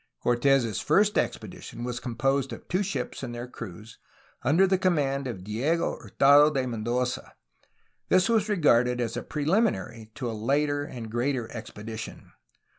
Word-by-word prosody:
Cortes' 120 -2 +2
first 200 +7 +3
expedition 120 - -3
was 120 0 -3
composed 135 +3 0
of - - -9
two 185 +2 0
ships 200 -1 -3
and 120 - -5
their 120 +1 -5
crews, 110 -2 -10 0.4
under 165 +8 +4
the 190 -1 +2
command 140 -7 +1
of 105 -7 -6
Diego 130 - -1
Hurtado 145 +2 +5
de 135 -4 -1
Men 115 -3 -4
doza. 125 +2 -2 0.8
This 185 0 +4
was 225 -2 +2
regarded 125 - +3
as 120 -2 -2
a - - -2
preliminary 150 - -1
to 125 - -4
a 115 - -3
later 145 +6 0
and 115 -5 -8
greater 120 0 -1
expedition. 110 -1 -8
130 Hz, 150 wpm, -27 LUFS, 115-150 Hz, 0.8 s, Hurtado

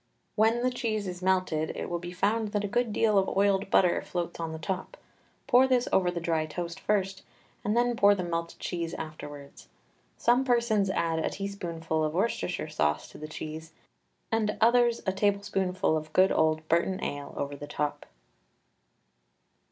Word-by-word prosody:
When 225 +2 +3
the 255 - +2
cheese 225 -4 -2
is 180 -1 -6
melted 185 -4 +1
it - - -3
will 175 - -2
be 175 0 -7
found 205 +4 0
that 205 -1 0
a - - -1
good 240 +2 0
deal 210 -1 +3
of 190 - 0
oiled 200 0 +2
butter 180 -3 +4
floats 175 -1 -4
on 165 -1 -3
the 160 - -5
top. 185 +4 -4 0.5
Pour 255 +2 +5
this 250 -2 +2
over 185 -2 +4
the 175 -1 -2
dry 165 -2 0
toast 170 +1 -5
first, 195 -2 0 0.4
and 210 +3 0
then 240 0 +2
pour 205 -2 +5
the 185 - -3
melted 170 -1 -3
cheese 170 -1 -3
afterwards. 145 -3 -9 0.5
Some 245 +2 +3
persons 235 -6 +2
add 165 -3 0
a 160 - 0
teaspoonful 170 -5 -3
of 155 +1 -1
Worcester 180 -4 -1
sauce 75 - 0
to - - -13
the 155 - -6
cheese, 155 +1 -7 0.6
and 220 -2 0
others 235 +1 +4
a 190 - +2
tablespoonful 195 -3 +1
of 155 0 -4
good 190 +1 +5
old 155 0 +1
Burton 170 +3 +1
ale 145 0 -4
over 145 0 -3
the 145 +1 -8
top. 150 0 -3
185 Hz, 175 wpm, -28 LUFS, 160-210 Hz, 0.6 s, Pour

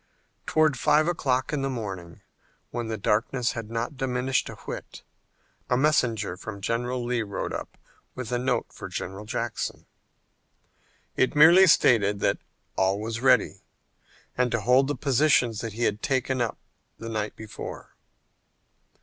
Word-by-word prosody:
Toward 155 -5 +2
five 150 +3 +3
o'clock 135 -5 0
in 145 - 0
the 135 - -1
morning, 95 -9 -6 0.5
when 120 -1 -3
the 110 0 -3
darkness 115 +4 0
had 115 -2 -6
not 115 +4 -3
diminished 130 0 0
a - - -8
whit, - - -8 0.7
a 125 - +3
messenger 120 -9 +1
from 100 +1 -7
General 120 +4 -2
Lee 120 -1 0
rode 100 -3 -4
up - - -6 0.4
with 130 -2 -6
a 120 - 0
note 130 - 0
for - - -7
General 95 +3 -6
Jackson. 115 0 -4 1.3
It 130 - +1
merely 170 +6 +8
stated 105 - +4
that - - +1 0.4
all 95 +1 +1
was 115 +2 -4
ready 130 -1 +3 0.7
and 125 -1 +1
to 115 - 0
hold 125 +4 +4
the 145 - -1
positions 130 -5 +2
that 115 -2 -5
he 120 +3 -3
had 105 -1 0
taken 130 -1 0
up 115 -3 -1 0.4
the 115 - -8
night 110 -2 -3
before. 110 -1 -8
120 Hz, 150 wpm, -26 LUFS, 110-130 Hz, 1.3 s, merely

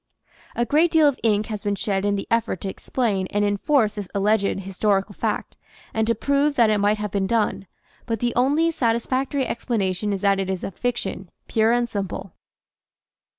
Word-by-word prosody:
A 240 - +1
great 310 +7 +3
deal 320 -2 +5
of 280 -3 0
ink 215 -2 +2
has 215 -3 -5
been 205 0 -1
shed 195 -1 -1
in 205 0 +2
the 195 - -3
effort 230 -5 0
to - - -4
explain 200 -3 -1
and 205 +2 0
enforce 215 +3 +2
this 205 -3 -6
alleged 200 -1 +1
historical 195 +1 0
fact - - -3 0.4
and 220 0 0
to 230 - +2
prove 280 +5 +1
that 230 -4 +4
it 210 - +2
might 205 +1 +2
have 210 -1 -4
been 195 -1 0
done, 210 -3 0 0.4
but 225 -2 -1
the 240 +1 0
only 290 +7 +2
satisfactory 260 +1 0
expla 235 0 -2
nation 190 +1 -1
is 195 -2 -2
that 200 -1 +3
it 190 -1 -2
is 190 -2 -3
a - - -3
fiction 195 -4 -3 0.2
pure 220 0 +2
and 240 0 +2
simple. 195 -4 -5
215 Hz, 195 wpm, -23 LUFS, 200-240 Hz, 0.4 s, deal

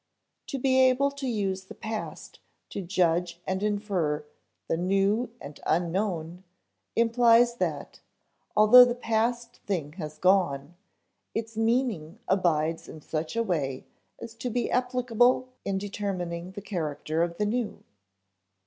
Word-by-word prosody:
To 275 - -3
be 260 0 +2
able 260 +2 +4
to 280 -1 -5
use 195 -5 -1
the - - -11
past 220 0 -6 0.3
to - - -4
judge 175 -1 0
and 190 +1 -2
infer 195 -8 -1 0.4
the - - +1
new 195 +7 +1
and 145 +1 -10
unknown 175 0 -1 0.5
implies 235 +1 +4
that, - - -3 0.6
although 215 +4 +10
the 245 -1 +1
past 235 0 -1
thing 160 -7 -2
has 155 -2 -6
gone, 175 -5 +2 0.6
its 225 0 -3
meaning 225 -7 0
abides 165 -4 +1
in 155 - -9
such 155 +5 -3
a 230 - +2
way 145 - -2 0.3
as 230 -1 -8
to 250 +1 -3
be 245 +1 -1
applicable 250 0 +2 0.2
in 195 -1 0
determining 190 -3 -4
the 205 - -8
character 160 -4 -2
of 170 0 -1
the 210 - +1
new. 230 +1 -2
200 Hz, 130 wpm, -27 LUFS, 170-235 Hz, 0.6 s, although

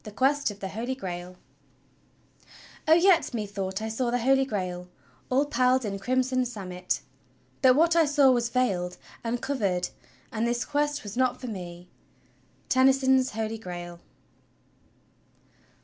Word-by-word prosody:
X 215 - -8
Quest 280 +2 +2
of 205 - -8
l^e 195 -2 -6
U'fol^ 245 +5 -4
(Brail 180 -2 -6 0.8
" - - -23
'O, 315 - +7
yet 345 -5 +4
methought 200 -2 -3
I 220 - -2
saw 240 +2 -1
the 245 - +1
Holy 270 +2 +3
Grail, 180 -6 -4 0.4
All 270 +3 +3
pall'd 255 -2 +2
in 195 -1 -3
crimson 255 +3 +1
samite, 185 -7 -4 0.6
but 255 -2 +6
what 330 +3 +4
I 330 -1 +5
saw 285 -2 +5
was 240 -2 +1
veil'd 190 -8 0 0.3
And 235 +1 -2
cover'd; 200 -10 0 0.4
and 230 -1 -1
this 240 0 -1
quest 295 0 -1
was 205 -1 -7
not 255 -1 +1
for 255 - -8
me.'" 180 -5 -7 0.8
Tennyson's 265 0 +3
"Holy 220 0 -3
Grail." 175 -3 -7
240 Hz, 145 wpm, -27 LUFS, 195-265 Hz, 0.8 s, O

